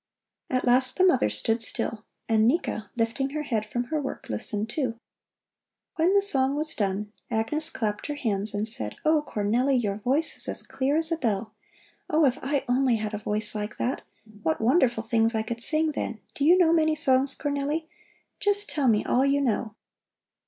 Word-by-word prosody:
At 255 -1 0
last 255 +1 +3
the 370 - +4
mother 270 -9 +3
stood 225 0 +1
still, 220 -1 +1 0.2
and 220 -1 +3
Nika, 235 - -1
lifting 235 +4 -1
her 300 +2 -4
head 220 -7 -2
from 240 +3 -2
her 305 - 0
work, 270 - -7
listened, 205 - -2
too. 235 -1 -3 1.0
When 345 +5 +2
the 400 - +4
song 270 -8 +1
was 305 +1 +2
done, 205 +1 -2 0.2
Agnes 245 +8 -1
clapped 215 -9 -3
her 295 - -3
hands 210 -6 -2
and 210 +2 -1
said: 110 - -3
"Oh, 310 0 +4
Cornelli, 245 +2 0
your 205 -5 -1
voice 270 +9 0
is - - +3
as - - -1
clear 275 +2 -1
as 320 +1 +1
a 330 - +1
bell! 215 -5 -2 0.6
Oh, 310 0 +3
if 270 +2 +1
I 280 +1 -1
only 250 0 +2
had 215 -1 -4
a 210 - -3
voice 210 0 -1
like 210 0 -5
that! 255 +3 -2 0.4
What 160 -3 -1
wonderful 240 -2 +2
things 225 0 +1
I 220 - 0
could 230 +1 -5
sing 310 +3 +2
then! 230 -6 -4
Do 285 - -1
you 350 +4 +6
know 340 -3 +4
many 315 -1 +2
songs, 270 -3 +3
Cornelli? 290 +2 -2 0.5
Just 410 0 +2
tell 285 -4 0
me 215 -3 +2
all 255 - +2
you 275 +1 +2
know." 225 -4 -1
255 Hz, 190 wpm, -26 LUFS, 220-295 Hz, 1.0 s, you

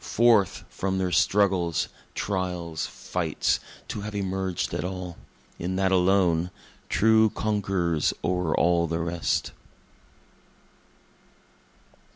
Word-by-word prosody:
Forth 115 -4 +3
from 95 0 -2
their 95 -1 0
struggles, 90 -1 +2 0.3
trials, 90 -4 -2
fights, - - -1 0.3
to 105 - -4
have 105 0 -6
emerged 95 -2 -2
at - - -2
all 90 -1 -5 0.4
in 90 +2 -2
that 95 0 +1
alone, 90 -2 +3 0.4
True 110 0 +4
conquerors 95 -8 0
o'er 90 -2 0
all 85 0 +3
the 80 0 -1
rest. 85 0 -1
95 Hz, 100 wpm, -26 LUFS, 85-100 Hz, 0.4 s, True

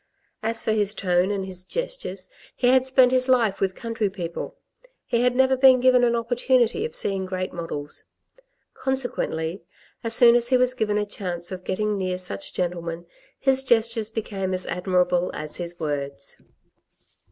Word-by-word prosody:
As 225 +1 -3
for - - +1
his 210 -1 0
tone 180 -1 +1
and 200 -2 -2
his 185 -1 -6
gestures, - - -4 0.3
he 245 - +2
had 260 0 +4
spent 260 -1 +5
his 255 0 +2
life 230 -6 +3
with 190 -1 0
country 230 -3 -2
people; 180 - -6 0.5
he 235 - 0
had 250 0 +2
never 265 0 +4
been 260 -1 +6
given 255 0 +5
an 235 -1 +3
opportunity 245 - +1
of 470 +1 -5
seeing 195 - 0
great 185 0 -4
models. 150 -4 -4 0.7
Consequently, 200 -10 -2 0.4
as 230 -1 0
soon 235 0 +7
as 240 0 +2
he 255 - +5
was 255 0 +3
given 215 -4 0
a 210 - 0
chance 175 -4 -5
of 185 -1 -6
getting 210 +2 -1
near 185 -1 -1
such 185 +11 -6
gentlemen, 170 -1 -3 0.3
his 265 -1 +2
gestures 230 -3 +2
became 195 -4 -3
as 185 - -2
admirable 180 -1 +1
as 150 0 -5
his 175 -1 -6
words. 140 -3 -4
210 Hz, 165 wpm, -24 LUFS, 180-250 Hz, 0.7 s, soon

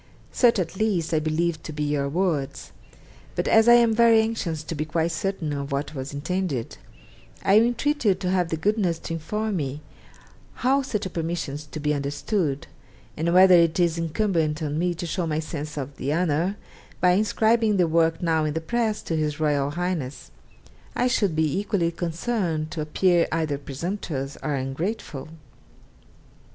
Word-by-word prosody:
Such, 240 -3 +4
at 180 -1 -2
least, 190 -7 0
I 155 - +3
believed 155 +1 -1
to - - -5
be 150 0 -3
your 145 -1 0
words; 150 -5 -2 0.6
but - - -1
as 225 +1 +5
I 240 - +9
am 235 -2 +5
very 230 0 +6
anxious 210 -9 -1
to 155 - -5
be 155 -1 -2
quite 160 +2 -1
certain 165 -2 -2
of 140 0 -4
what 140 +2 -2
was 135 -1 -5
intended, 145 -3 -3 0.7
I 200 +2 +6
entreat 245 +6 +1
you 200 -4 +4
to 185 -1 -2
have 180 -3 +1
the 160 - -1
goodness 195 -2 +1
to 165 - -6
inform 210 +6 -2
me 145 -1 -3 0.8
how 270 +2 +4
such 215 -7 -3
a - - -3
permission 165 -3 -3
is 150 +1 -7
to 155 - -7
be 150 0 0
understood, 145 +2 -1 0.5
and 165 +2 0
whether 185 +1 +7
it 170 -1 +4
is 170 -1 +2
incumbent 165 -2 0
on 150 +1 -2
me 175 0 0
to 175 +1 -5
show 170 +1 -2
my 155 -1 -1
sense 155 -1 -5
of 140 0 -5
the 140 - -2
honour, 170 +4 0 0.4
by 180 - +4
inscribing 215 +2 +2
the 180 - +4
work 165 +1 +2
now 160 -2 +2
in 155 0 -1
the - - +1
press 220 +5 -1
to 165 - -2
His 155 -1 -1
Royal 145 -2 +1
Highness; 165 -4 -4 0.6
I 245 - +1
should 205 -8 +1
be 160 +2 +1
equally 200 -5 0
concerned 170 -1 -2
to 160 - -3
appear 170 +3 +2
either 155 -3 -1
presumptuous 145 -1 -4
or 150 -2 -1
ungrateful.' 140 +3 -4
165 Hz, 175 wpm, -25 LUFS, 150-195 Hz, 0.8 s, I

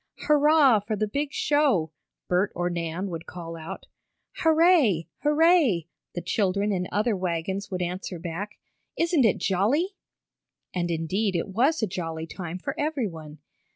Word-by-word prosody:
"Hurrah 295 -5 +5
for 210 +2 -3
the 215 +1 0
big 285 +6 -2
show!" 275 - +2 0.4
Bert 180 +3 +1
or 175 0 -1
Nan 170 +3 -3
would 165 0 -6
call 165 -2 -7
out. 160 0 -8 0.5
"Hurray! 320 - +4
Hurray!" 300 - +3 0.3
the 175 - -4
children 200 +2 0
in 180 -2 -1
other 215 +1 +1
wagons 185 +2 -3
would 180 -2 -2
answer 180 +1 -4
back. 175 +5 -6 0.4
"Isn't 335 -6 +3
it 210 - +3
jolly?" 220 - +1 0.8
And 175 -1 -1
indeed 185 +5 -1
it 170 - -1
was 250 - +2
a - - +2
jolly 165 -3 -4
time 175 0 -6
for 180 - -4
everyone. 200 - -3
195 Hz, 145 wpm, -26 LUFS, 175-275 Hz, 0.8 s, Hurrah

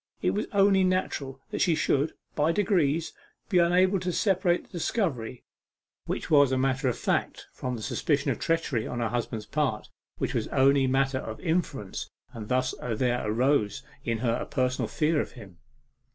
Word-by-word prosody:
It - - +3
was 210 - -2
only 195 -1 +4
natural 150 -8 -1
that - - -2
she 170 -3 +3
should, 145 -1 +1 0.2
by 150 +2 +2
degrees, 165 -5 +1 0.4
be 180 - +4
unable 185 +3 +4
to 180 0 -2
separate 180 -1 +1
the - - -24
discovery, 155 - -2 0.6
which - - -3
was 145 -3 +6
matter 130 +1 +1
of 120 - -2
fact, - - -1
from 125 -1 -4
the 110 - -7
suspicion 145 +4 0
of - - -3
treachery 165 -9 0
on 120 - -4
her 115 -2 0
husband's 115 -2 -3
part, 140 -8 -1 0.3
which - - -2
was - - -1
only 135 0 +3
matter 135 0 +1
of 110 -3 -7
inference. 160 - -2 0.2
And 110 -3 -7
thus 130 0 +1
there 125 +1 0
arose 110 -1 +1 0.2
in 115 -1 -1
her 115 - +2
a - - -5
personal 130 -2 0
fear 155 0 +1
of - - -7
him. 95 -9 -13
135 Hz, 170 wpm, -27 LUFS, 125-170 Hz, 0.6 s, was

